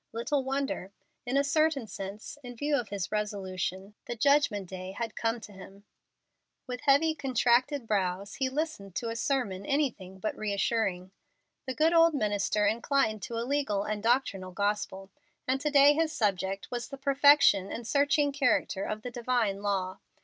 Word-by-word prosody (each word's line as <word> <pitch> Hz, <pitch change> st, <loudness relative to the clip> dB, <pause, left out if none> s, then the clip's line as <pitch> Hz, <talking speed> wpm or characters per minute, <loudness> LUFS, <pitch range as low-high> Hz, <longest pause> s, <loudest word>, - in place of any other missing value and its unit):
Little 265 Hz, +5 st, -1 dB
wonder. 265 Hz, -8 st, -3 dB, 0.4 s
In 255 Hz, +3 st, +1 dB
a 280 Hz, -, +4 dB
certain 300 Hz, -2 st, +1 dB
sense, 205 Hz, +6 st, -8 dB
in 245 Hz, -2 st, -9 dB
view 290 Hz, +5 st, 0 dB
of 245 Hz, -6 st, -2 dB
his 200 Hz, -2 st, -4 dB
resolution, 195 Hz, -2 st, -3 dB
the 240 Hz, -, -4 dB
Judgment 245 Hz, -6 st, +2 dB
Day 185 Hz, +1 st, -7 dB
had 225 Hz, +2 st, -4 dB
come 230 Hz, +1 st, -1 dB
to 210 Hz, -, -11 dB
him. 195 Hz, +1 st, -13 dB, 0.8 s
With 250 Hz, -1 st, -6 dB
heavy, 295 Hz, +3 st, +4 dB
contracted 255 Hz, -1 st, +1 dB
brows 195 Hz, -2 st, -1 dB
he 265 Hz, -1 st, -1 dB
listened 260 Hz, -, -4 dB
to 230 Hz, -, -2 dB
a 230 Hz, -, -4 dB
sermon 230 Hz, -7 st, -1 dB
anything 215 Hz, -8 st, -1 dB
but 215 Hz, +3 st, -3 dB
reassuring. 200 Hz, -3 st, -1 dB, 0.6 s
The 260 Hz, -, -3 dB
good 320 Hz, +2 st, +3 dB
old 330 Hz, -1 st, +5 dB
minister 210 Hz, -3 st, +1 dB
inclined 220 Hz, 0 st, +1 dB
to 230 Hz, +5 st, -5 dB
a 230 Hz, -, -2 dB
legal 265 Hz, -7 st, 0 dB
and 210 Hz, 0 st, -3 dB
doctrinal 215 Hz, -6 st, 0 dB
gospel, 200 Hz, -1 st, -2 dB, 0.4 s
and 265 Hz, +1 st, 0 dB
to 300 Hz, -, 0 dB
day 285 Hz, 0 st, +7 dB
his 320 Hz, +1 st, 0 dB
subject 195 Hz, -, -1 dB
was 240 Hz, -1 st, -3 dB
the 275 Hz, -, -7 dB
perfection 275 Hz, -7 st, +5 dB
and 235 Hz, -, -5 dB
searching 285 Hz, +2 st, +2 dB
character 250 Hz, -7 st, +1 dB
of 215 Hz, 0 st, -4 dB
the 245 Hz, -, -5 dB
divine 235 Hz, -5 st, 0 dB
law. 190 Hz, -2 st, -2 dB
230 Hz, 165 wpm, -29 LUFS, 200-275 Hz, 0.8 s, day